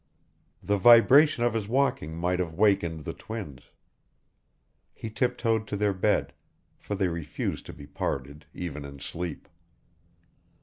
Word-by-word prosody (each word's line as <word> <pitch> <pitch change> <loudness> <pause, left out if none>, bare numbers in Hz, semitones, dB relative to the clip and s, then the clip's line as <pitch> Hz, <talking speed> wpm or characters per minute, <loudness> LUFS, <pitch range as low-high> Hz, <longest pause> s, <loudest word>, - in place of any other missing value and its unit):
The 100 0 +1
vibration 120 +6 +6
of 120 -2 +2
his 110 -3 -2
walking 115 - 0
might 90 +2 0
have 85 -3 -3
wakened 85 -5 +2
the - - -5
twins. 95 - -8 1.3
He 110 - -7
tiptoed 115 -2 0
to 100 - -3
their 105 0 +1
bed 100 +3 0 0.5
for 105 - -4
they 95 -1 +1
refused 85 -4 -4
to - - -8
be 70 - -11
parted 70 0 -5
even 75 -5 -6
in 70 0 -10
sleep. 85 +4 -6
95 Hz, 135 wpm, -27 LUFS, 80-110 Hz, 1.3 s, vibration